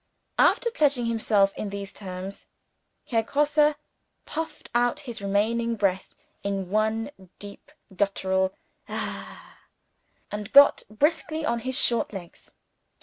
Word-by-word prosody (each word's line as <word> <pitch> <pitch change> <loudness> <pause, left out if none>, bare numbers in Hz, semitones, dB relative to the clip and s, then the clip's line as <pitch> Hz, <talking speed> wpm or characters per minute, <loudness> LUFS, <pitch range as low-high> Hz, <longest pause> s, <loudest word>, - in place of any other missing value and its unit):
After 470 - +4
pledging 285 - +2
himself 215 -4 +2
in 210 - -4
those 200 -1 -6
terms, 190 0 -8 0.6
Herr 230 -2 +1
Grosse 295 +4 +2 0.5
puffed 320 -1 -5
out 240 0 +2
his 240 -6 -7
remaining 225 +4 +1
breath 195 -3 -1 0.3
in 195 -2 -3
one 220 +4 0 0.3
deep 205 +7 -12 0.2
guttural 190 -1 +1 0.4
"Hah!" - - -6 0.7
and 210 -1 -5
got 280 +1 +8
briskly 310 +6 0
on 235 -3 0
his 260 +2 -2
short 235 -2 +2
legs. 175 -4 -10
220 Hz, 115 wpm, -26 LUFS, 200-270 Hz, 0.7 s, got